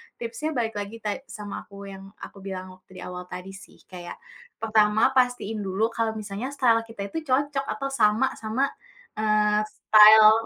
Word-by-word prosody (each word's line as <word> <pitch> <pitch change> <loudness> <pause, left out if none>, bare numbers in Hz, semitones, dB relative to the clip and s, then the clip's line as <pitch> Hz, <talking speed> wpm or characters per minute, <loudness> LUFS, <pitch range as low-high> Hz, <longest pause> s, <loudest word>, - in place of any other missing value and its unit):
tipsnya 240 +7 -4
balik 225 -3 -1
lagi 205 +2 -6
ta 210 - -1 0.2
sama 210 -4 -8
aku 200 - -15 0.2
yang 195 0 -10 0.2
aku - - -10
bilang 190 -1 -7
waktu 185 0 -20
di - - -9
awal 180 0 -7
tadi 180 +2 -8
sih, 195 0 -15
kayak 175 -1 -8 0.5
pertama 220 +2 +3
pastiin 245 -4 +1
dulu 205 +3 -1
kalau 225 -1 -1
misalnya 210 +2 -5
style 235 -4 +4
kita 225 -3 -7
itu - - -4
cocok 275 +1 0
atau 275 -1 -3
sama 230 0 +2
sama, 220 +4 -1 0.6
eee, 210 -1 +2
style 215 0 +7
215 Hz, 165 wpm, -25 LUFS, 200-230 Hz, 0.6 s, style